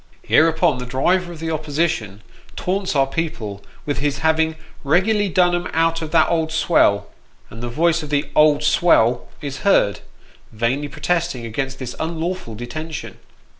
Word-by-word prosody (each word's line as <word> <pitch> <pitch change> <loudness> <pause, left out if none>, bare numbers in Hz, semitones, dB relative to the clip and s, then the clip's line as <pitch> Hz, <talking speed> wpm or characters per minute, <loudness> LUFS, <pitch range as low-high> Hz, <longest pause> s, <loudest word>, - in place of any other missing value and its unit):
Hereupon 160 -3 +3
the 125 - -6
driver 175 +8 +1
of 165 - -10
the 160 0 -3
opposition 145 - -2 0.3
taunts 190 -2 -2
our 135 -1 +4
people 115 -10 -4 0.2
with 145 - -2
his 140 0 -1
having 160 0 +2 0.2
" - - -26
regularly 195 +8 +2
done 180 -1 +3
'em 175 0 -1
out 165 0 +1
of 160 - -4
that 160 0 +4
old 160 -2 0
swell," 155 -11 +3 0.5
and 115 - -9
the 120 - -4
voice 165 +6 +1
of 150 - -7
the 145 0 0
" - - -25
old 150 -1 +4
swell 150 -6 +3
" - - -27
is 140 -3 -5
heard, 105 - +3 0.5
vainly 120 +6 -1
protesting 155 -3 -2
against 135 +4 -3
this 125 -2 -6
unlawful 165 -6 -3
detention. 150 +8 -7
155 Hz, 170 wpm, -20 LUFS, 130-165 Hz, 0.5 s, our